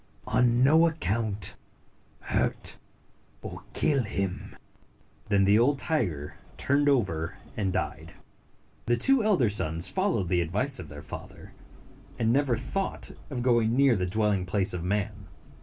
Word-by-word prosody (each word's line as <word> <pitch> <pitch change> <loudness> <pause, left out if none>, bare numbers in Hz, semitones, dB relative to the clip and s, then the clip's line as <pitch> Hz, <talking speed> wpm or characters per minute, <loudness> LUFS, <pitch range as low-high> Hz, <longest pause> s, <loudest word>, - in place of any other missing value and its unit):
On 120 0 +3
no 160 +5 +6
account, 110 - -1 0.7
hurt - - -2 0.6
or - - -7
kill 140 -3 +3
him." 100 -4 -4 0.7
Then 100 -1 +3
the 100 +3 +5
old 135 +4 +3
tiger 115 - -2 0.2
turned 145 +1 +2
over 95 - 0 0.2
and 100 -3 -1
died. 80 +1 -4 0.7
The 120 0 +2
two 270 - +3
elder 195 - +3
sons 90 -5 0
followed 185 - 0
the 90 -1 +2
advice 105 - 0
of 80 -4 -8
their 75 -1 -9
father, - - -10 0.6
and 115 0 +2
never 135 -3 +2
thought 195 - -3 0.2
of 125 -4 -3
going 120 -2 +3
near 135 -2 +4
the 90 -2 -1
dwelling 100 -1 0
place 95 0 +1
of 90 -2 -4
man. 100 +1 -2
110 Hz, 140 wpm, -27 LUFS, 95-135 Hz, 0.7 s, no